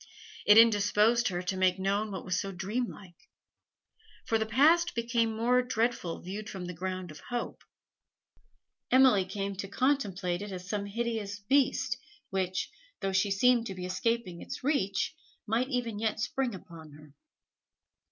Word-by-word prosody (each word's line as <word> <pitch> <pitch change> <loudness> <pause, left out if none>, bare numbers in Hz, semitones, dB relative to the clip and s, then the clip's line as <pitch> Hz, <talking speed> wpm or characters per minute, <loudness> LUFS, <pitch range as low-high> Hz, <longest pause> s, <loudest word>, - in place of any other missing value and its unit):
It 210 - +8
indisposed 225 +1 +5
her 180 -2 -2
to 180 +1 -2
make 185 0 +2
known 200 +3 0
what 190 -3 -6
was 180 -1 0
so 195 - -5
dreamlike. 195 -1 -5 1.0
For 225 -3 +1
the 220 - -1
past 320 +9 +4
became 235 -1 +1
more 245 +3 +3
dreadful 230 -7 -1
viewed 200 +4 -6
from 185 -2 -6
the 180 - -5
ground 185 0 -4
of 150 - -11
hope. 245 -1 -4 1.3
Emily 255 -7 +5
came 195 +1 -4
to 195 - -4
contemplate 200 -7 0
it 205 0 -6
as 180 -1 -7
some 200 +1 -2
hideous 220 -2 -3
beast, 265 +5 +1 0.3
which, 185 -1 -1 0.3
though 195 -1 -1
she 195 +2 +2
seemed 235 +4 +3
to 190 - -6
be 180 -1 -5
escaping 185 -1 -1
its - - -7
reach, 260 -5 0 0.3
might 235 +4 0
even 240 -5 -2
yet 220 -1 -1
spring 245 0 -1
upon 165 -4 -12
her. 150 -1 -15
205 Hz, 150 wpm, -30 LUFS, 185-235 Hz, 1.3 s, It